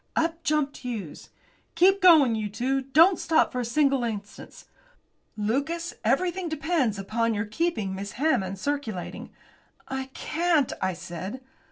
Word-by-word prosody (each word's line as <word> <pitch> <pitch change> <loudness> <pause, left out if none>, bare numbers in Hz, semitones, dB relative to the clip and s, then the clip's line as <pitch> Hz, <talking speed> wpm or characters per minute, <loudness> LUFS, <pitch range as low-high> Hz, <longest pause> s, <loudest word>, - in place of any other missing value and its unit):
Up 330 +1 0
jumped 300 -3 0
Hughes. 225 - -7 0.5
"Keep 380 +4 +4
going, 315 -9 +7
you 215 -1 -2
two! 260 +6 -1
Don't 315 +8 +4
stop 320 -1 +2
for 250 - -3
a - - -1
single 275 +1 +2
instant. 210 -3 -6 0.7
Lucas, 280 +11 -1
everything 350 - 0
depends 315 - 0
upon 225 +3 -1
your 205 +2 -1
keeping 215 - -2
Miss 200 +1 -6
Hammond 195 -10 0
circulating." 230 -6 -4 0.6
"I 265 0 -3
can't," 325 -4 +1
I 190 - 0
said. 180 +8 -7
265 Hz, 135 wpm, -26 LUFS, 215-320 Hz, 0.7 s, going